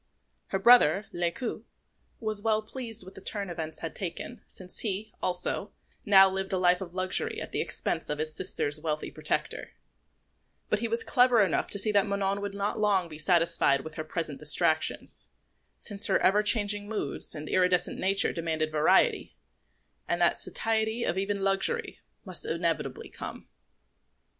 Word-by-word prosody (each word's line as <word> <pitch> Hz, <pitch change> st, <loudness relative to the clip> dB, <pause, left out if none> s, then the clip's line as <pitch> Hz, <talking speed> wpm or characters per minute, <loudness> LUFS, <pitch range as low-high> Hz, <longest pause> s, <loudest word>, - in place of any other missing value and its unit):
Her 195 Hz, -, -1 dB
brother, 195 Hz, -3 st, +5 dB
Lescaut, 175 Hz, +7 st, -2 dB, 0.6 s
was 215 Hz, -2 st, -1 dB
well 220 Hz, 0 st, +1 dB
pleased 230 Hz, -2 st, -6 dB
with 190 Hz, +1 st, -12 dB
the 195 Hz, -, -12 dB
turn 200 Hz, -2 st, -4 dB
events 160 Hz, -2 st, -6 dB
had 165 Hz, -, -5 dB
taken, 190 Hz, +6 st, -6 dB
since 180 Hz, -1 st, -5 dB
he, 210 Hz, 0 st, -1 dB
also, 180 Hz, +2 st, -1 dB, 0.3 s
now 195 Hz, -1 st, +8 dB
lived 190 Hz, 0 st, -3 dB
a -, -, +2 dB
life 180 Hz, 0 st, +3 dB
of 180 Hz, -2 st, -8 dB
luxury 185 Hz, 0 st, 0 dB
at -, -, -7 dB
the -, -, 0 dB
expense -, -, -3 dB
of 150 Hz, -, -2 dB
his 155 Hz, +1 st, -2 dB
sister's 155 Hz, -4 st, -1 dB
wealthy 155 Hz, -1 st, -3 dB
protector; -, -, -3 dB, 1.0 s
but 210 Hz, -, +3 dB
he 230 Hz, -, -1 dB
was 230 Hz, 0 st, -1 dB
clever 245 Hz, -3 st, +4 dB
enough 185 Hz, -, 0 dB
to -, -, +2 dB
see 210 Hz, +2 st, +2 dB
that 205 Hz, 0 st, +3 dB
Manon 200 Hz, 0 st, -1 dB
would 200 Hz, 0 st, -5 dB
not 200 Hz, +2 st, -2 dB
long 195 Hz, -5 st, +1 dB
be 155 Hz, -1 st, -9 dB
satisfied 165 Hz, -5 st, +3 dB
with 160 Hz, +2 st, -9 dB
her 155 Hz, -, -5 dB
present 155 Hz, -2 st, -4 dB
distractions, 155 Hz, +1 st, +1 dB, 0.5 s
since 205 Hz, 0 st, +1 dB
her 195 Hz, -, +3 dB
ever 205 Hz, +3 st, +3 dB
changing 205 Hz, -1 st, +2 dB
moods 210 Hz, -10 st, -2 dB
and 155 Hz, 0 st, -7 dB
iridescent 180 Hz, -1 st, +1 dB
nature 195 Hz, +1 st, +3 dB
demanded 160 Hz, -2 st, -2 dB
variety, 155 Hz, 0 st, +2 dB, 0.7 s
and -, -, -1 dB
that -, -, +3 dB
satiety 225 Hz, +1 st, -1 dB
of -, -, 0 dB
even 200 Hz, 0 st, -2 dB
luxury 195 Hz, -, 0 dB, 0.3 s
must 185 Hz, -3 st, -3 dB
inevitably 165 Hz, -5 st, -2 dB
come. -, -, -8 dB
190 Hz, 160 wpm, -28 LUFS, 165-210 Hz, 1.0 s, now